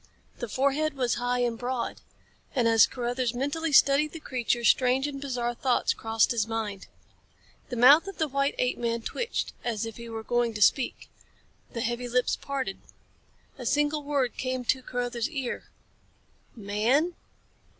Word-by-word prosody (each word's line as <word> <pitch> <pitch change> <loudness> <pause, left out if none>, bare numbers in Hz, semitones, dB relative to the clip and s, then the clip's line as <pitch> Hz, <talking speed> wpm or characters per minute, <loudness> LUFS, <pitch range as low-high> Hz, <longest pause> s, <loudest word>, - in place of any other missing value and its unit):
The 240 - -4
forehead 280 +5 +1
was 250 -3 +1
high 245 0 0
and 235 -2 -1
broad. 245 -1 -3 0.5
And 245 -3 +3
as 225 -1 +6
Carruthers 245 0 -2
mentally 290 +5 -1
studied 280 +2 +5
the 325 - -7
creature, 240 -4 -1
strange 255 +3 +3
and 280 -2 -5
bizarre 245 -3 -2
thoughts 250 +1 +1
crossed 225 -1 +1
his 225 -3 0
mind. 215 -4 -4 0.8
The - - -4
mouth 280 +10 +7
of 390 - -7
the 315 - +1
white 275 0 0
apeman 235 -2 -1
twitched 470 - -3
as 230 -3 -2
if 225 - -7
he 235 0 -8
were 225 -1 -5
going 240 -1 0
to 210 - -4
speak. 265 +3 +1 0.7
The 230 - -3
heavy 240 +1 -2
lips 250 +1 +1
parted. 270 -8 -4 0.8
A 250 - -6
single 295 +2 +1
word 280 -4 -1
came 255 -1 -2
to 260 +2 +1
Carruthers' 245 0 -3
ear 270 -6 -4 0.9
"Man?" 230 - +1
245 Hz, 155 wpm, -27 LUFS, 235-275 Hz, 0.9 s, mouth